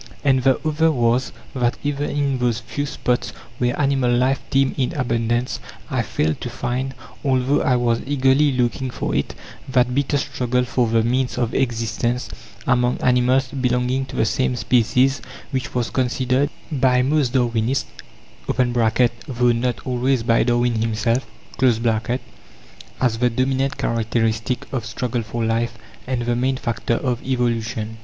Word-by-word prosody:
And 135 -2 +3
the 130 0 +3
other 160 +1 +3
was, 120 -1 +1 0.2
that 120 -2 0
even 145 0 -1
in 140 -2 0
those 120 -2 +1
few 145 +5 -4
spots 120 -5 -1 0.3
where 120 +2 0
animal 135 -3 +2
life 130 +3 +2
teemed 135 0 +2
in 130 +5 0
abundance, 120 -3 -1 0.3
I - - +1
failed 80 0 -1
to 125 - -3
find 125 +3 -3 0.3
although 130 +1 +2
I 125 - +2
was 120 -1 +1
eagerly 140 +1 +3
looking 125 +1 0
for - - -3
it - - -1 0.3
that 125 -1 +2
bitter 140 +2 +1
struggle 125 -2 0
for 125 -1 +1
the 115 0 +2
means 125 +2 0
of 120 -2 -1
existence, 120 0 -1 0.4
among 125 -3 +2
animals 125 +1 +3
belonging 125 0 0
to - - -9
the - - +2
same 125 +3 0
species, 125 +4 +2 0.3
which 130 0 -3
was 120 -2 0
considered 130 +2 +1 0.2
by 125 -3 +3
most 140 -2 +1
Darwinists 120 0 +1 0.6
(though 120 0 +1
not 120 +1 -1
always 125 -1 +1
by 115 0 +3
Darwin 120 -1 +1
himself) 115 +3 0 0.3
as 125 -4 +4
the 120 +1 -2
dominant 135 +3 0
characteristic 115 +1 -1
of 125 -4 -1
struggle 125 -2 -2
for 115 +1 -3
life, 115 +1 -1 0.3
and 125 -2 -1
the 120 0 0
main 130 +2 0
factor 115 -1 -1
of 125 -2 -2
evolution. 115 -3 -1
125 Hz, 145 wpm, -21 LUFS, 120-130 Hz, 0.6 s, as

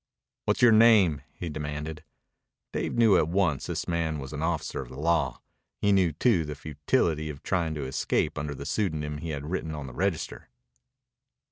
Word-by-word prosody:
"What's - - +1
your 120 - +8
name?" 110 -9 +6
he 85 - -7
demanded. 75 0 -5 0.7
Dave - - -2
knew 115 -5 +5
at 80 - +2
once 85 -5 +1
this - - -3
man 85 -2 -1
was 70 0 -7
an 75 - -4
officer 80 -4 -1
of 65 - -9
the 65 - -10
law. 80 -5 +1 0.4
He 100 - +2
knew, 95 -4 +4
too, 90 - +2
the 75 -1 -5
futility 75 +2 0
of 70 -2 -8
trying 85 -4 0
to 75 -3 -3
escape 65 - 0
under 75 0 -4
the 70 - -7
pseudonym 75 -5 -1
he 85 - -5
had 75 +1 -4
written 80 -4 -2
on 75 -2 -6
the 65 - -8
register. 95 -2 -2
80 Hz, 180 wpm, -27 LUFS, 75-90 Hz, 0.7 s, your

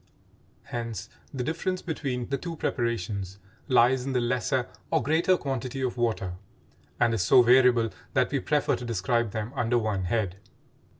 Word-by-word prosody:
Hence 115 -4 -5 0.2
the 130 -3 -3
difference 175 +5 -2
between 135 -7 -3
the 140 - 0
two 170 +1 -5
preparations 100 - -2 0.3
lies 125 -1 +4
in 135 0 -3
the 125 - +2
lesser 125 +1 0 0.2
or - - +1
greater 165 +7 +3
quantity 135 -2 -3
of 130 -2 -1
water, 110 -7 -1 0.7
and 120 -1 +3
is 110 - 0
so 120 +7 +6
variable 120 -2 +5 0.2
that - - +2
we - - +1
prefer - - +1
to - - -8
describe 115 +1 0
them 110 +3 -4
under 120 +1 +1
one 105 -5 -1
head. 95 -2 -1
120 Hz, 160 wpm, -27 LUFS, 110-130 Hz, 0.7 s, so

